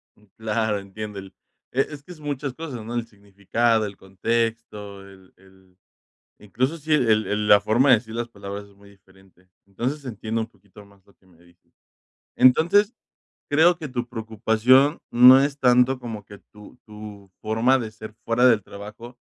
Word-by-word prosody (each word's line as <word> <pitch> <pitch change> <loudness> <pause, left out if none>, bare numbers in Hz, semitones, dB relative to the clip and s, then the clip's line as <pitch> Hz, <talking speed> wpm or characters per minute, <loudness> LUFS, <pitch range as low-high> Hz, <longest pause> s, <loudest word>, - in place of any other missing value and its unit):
Mm, 105 - -26
claro. 110 -1 -1
Entiendo 100 +1 -8
el, 95 0 -12 0.4
e 135 - +1
es 145 0 -6
que 180 - -14
es 170 - -12
muchas 145 -2 -4
cosas 135 -7 -7
¿no? 115 - -7
El 120 -1 -3
significado, 105 +2 -1
el 100 -1 -8
contexto, 105 0 -3
el 95 -1 -18
el 95 -1 -24 0.6
incluso 130 +9 -2
si 155 +1 -4
el 140 -6 +3 0.2
el 105 0 -2
la 105 - +7
forma 120 +6 +2
de 125 - +8
decir 110 0 -9
las 120 0 -3
palabras 100 -2 -8
es 100 - -22
muy 100 0 -19
diferente. 95 -2 -24 0.2
Entonces, 130 +9 -4
entiendo 115 -2 -4
un 110 - -3
poquito 105 -1 -18
más 100 -1 -24
lo 100 - -25
que 95 - -32
me 85 -2 -24
dices. 85 0 -27 0.6
Entonces, 190 - +4 0.6
creo 165 +4 +4
que 155 -3 -7
tu 125 -2 -4
preocupación 115 +5 +2
no 125 +2 +8
es 140 0 -2
tanto 125 0 +3
como 110 -4 -8
que 100 - -13
tu 105 +3 -15
tu 105 -2 -12
forma 115 +5 +2
de 110 -3 -6
ser 110 0 -11
fuera 115 +2 +2
del 115 -4 +5
trabajo, 105 +5 -11
110 Hz, 175 wpm, -23 LUFS, 100-125 Hz, 0.6 s, de